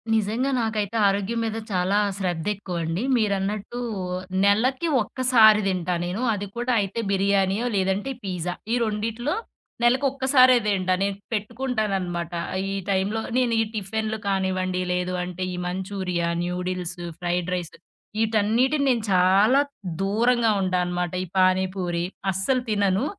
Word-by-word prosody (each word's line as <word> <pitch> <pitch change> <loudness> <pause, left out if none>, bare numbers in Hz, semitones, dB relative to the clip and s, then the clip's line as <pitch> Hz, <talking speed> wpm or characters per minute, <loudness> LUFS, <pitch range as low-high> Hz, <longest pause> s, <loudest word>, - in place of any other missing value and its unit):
నిజంగా 220 +6 0
నాకైతే 220 -1 -1
ఆరోగ్యం 200 +4 0
మీద 220 0 -2
చాలా 185 +2 +1 0.2
శ్రద్దెక్కువండి. 180 -1 -2
మీరన్నట్టు 205 +2 -1 0.7
నెలకి 255 +10 +2 0.2
ఒక్కసారి 225 -5 +5
దింటా 180 -2 -1
నేను. 185 +7 -3
అది 205 0 -4
కూడా 240 +1 0
అయితే 200 +3 -3
బిర్యానీయో, 195 +2 +2
లేదంటే 195 +6 0
పిజ్జా. 180 -2 -3 0.2
ఈ - - +3
రెండిట్లో 225 +6 -2 0.5
నెలకొక్కసారే 260 0 +4
దింట 190 -3 0
నేను 200 0 0 0.2
పెట్టుకుంటాననమాట. 210 -7 -2 0.4
ఈ - - -2
టైం‌లో 195 +3 0 0.2
నేను 245 -2 +2
ఈ - - +3
టిఫెన్‌లు 220 +1 -2
కానివ్వండి 185 -1 0
లేదు 180 0 -1
అంటే 180 +1 -5
ఈ - - -4
మంచూరియా, 185 -1 -2 0.2
న్యూడిల్స్, 180 0 -3 0.2
ఫ్రైడ్ 175 0 -1
రైసు. 175 -3 -5 0.5
ఈటన్నిటిని 225 +7 +2
నేను 235 -4 +1
చాలా 195 +8 +5 0.4
దూరంగా 225 +3 +2
ఉంటాను 180 -1 +1
అనమాట. 175 -1 -2
ఈ - - -13
పాని 185 0 +4
పూరి 175 -2 -2 0.3
అస్సలు 220 +8 0
తినను. 205 +2 +1
200 Hz, 120 wpm, -24 LUFS, 185-225 Hz, 0.7 s, ఒక్కసారి